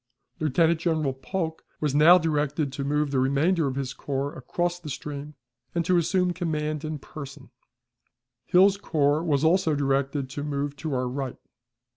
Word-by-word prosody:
Lieutenant 160 +2 +2
General 160 -5 0
Polk 160 +4 -4 0.2
was 150 -3 0
now 155 +5 +8
directed 150 -3 0
to 140 - -3
move 145 +1 0
the 135 - +1
remainder 145 +5 +2
of 130 - -3
his 135 -1 -3
corps 140 +1 -3
across 175 +4 -2
the 165 -4 -8
stream, 145 +1 -6 0.4
and 170 -1 0
to 180 - +3
assume 180 +1 +2
command 155 -3 -2
in 155 0 -3
person; 140 -1 -10 1.0
Hill's 190 +2 +5
corps 150 -5 +1
was 150 -4 +1
also 160 -1 +3
directed 140 0 0
to 145 +2 -4
move 145 -1 -2
to 150 -1 -3
our 125 0 0
right. 130 0 -4
150 Hz, 160 wpm, -26 LUFS, 140-165 Hz, 1.0 s, now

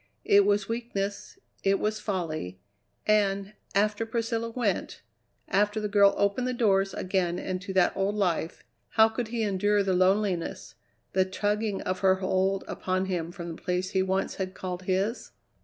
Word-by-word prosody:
It 200 0 +5
was 205 -1 +2
weakness, 225 - -4 0.3
it 195 0 +3
was 215 0 -1
folly, 155 - -3 0.5
and, 200 -1 +2 0.2
after 210 +2 +2
Priscilla 230 0 -2
went, 225 -5 -2 0.4
after 205 +2 +1
the 210 - -2
girl 200 -1 +5
opened 200 +5 +1
the 255 - -1
doors 195 -4 +2
again 180 -2 0
into 185 +1 -4
that 185 -1 +3
old 195 +2 0
life, 175 -5 -1 0.3
how 220 0 +6
could 225 +1 -3
he 230 0 -2
endure 205 0 +2
the 190 -1 +1
loneliness, 185 -1 +1 0.4
the 190 - +4
tugging 205 +2 -1
of 185 0 -2
her 190 -1 +4
hold 190 +1 0
upon 185 0 -1
him 175 -3 -2
from 170 -1 -7
the - - -15
place 180 +1 -1
he 190 - +2
once 190 +1 0
had 185 0 -4
called 180 -1 -5
his? 195 +5 -1
195 Hz, 160 wpm, -28 LUFS, 185-210 Hz, 0.5 s, how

